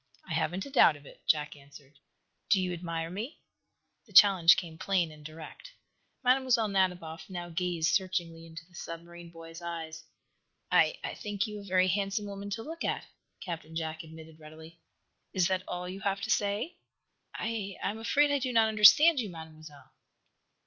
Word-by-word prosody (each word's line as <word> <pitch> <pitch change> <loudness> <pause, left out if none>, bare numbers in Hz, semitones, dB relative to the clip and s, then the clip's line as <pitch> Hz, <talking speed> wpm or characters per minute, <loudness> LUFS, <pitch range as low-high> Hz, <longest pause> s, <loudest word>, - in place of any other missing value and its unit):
"I 170 - -4
haven't 175 +4 -1
a 280 - -10
doubt 205 - +6
of 145 0 -15
it," - - -15
Jack 150 -1 +1
answered. 140 0 -17 0.5
"Do 195 - +5
you 180 -1 -1
admire 165 -1 -4
me?" 220 - -6 0.7
The 205 - -19
challenge 190 -2 +8
came 165 -3 -6
plain 180 -5 0
and 150 -1 -14
direct. 160 - -11 0.5
Mlle. 255 -3 +3
Nadiboff 180 -4 -1
now 175 -2 -6
gazed 170 -1 0
searchingly 175 -5 -2
into 165 0 -10
the 180 - -26
submarine 170 0 -9
boy's 165 0 -11
eyes. 160 -2 -6 0.7
"I - - +4
I - - -4
think 205 -2 -3
you 210 -1 -7
a - - -10
very 185 -1 +2
handsome 200 +2 -1
woman 200 0 -7
to 225 +3 -4
look 330 +4 -7
at," - - -2 0.4
Captain 165 -3 -7
Jack 160 -1 -3
admitted, 160 0 -13
readily. 160 +2 -13 0.5
"Is 185 -3 +2
that 185 -1 0
all 180 0 -4
you 185 +2 -6
have 200 0 -1
to 220 - -2
say?" 210 - -1 0.6
"I 215 -3 -3
I - - 0
am 220 - -8
afraid 285 +6 +2
I 285 - +2
do 255 -1 -2
not 225 -2 +4
understand 270 +9 +7
you, 220 -4 -2
Mademoiselle." 155 -3 -12
180 Hz, 175 wpm, -30 LUFS, 160-205 Hz, 0.7 s, challenge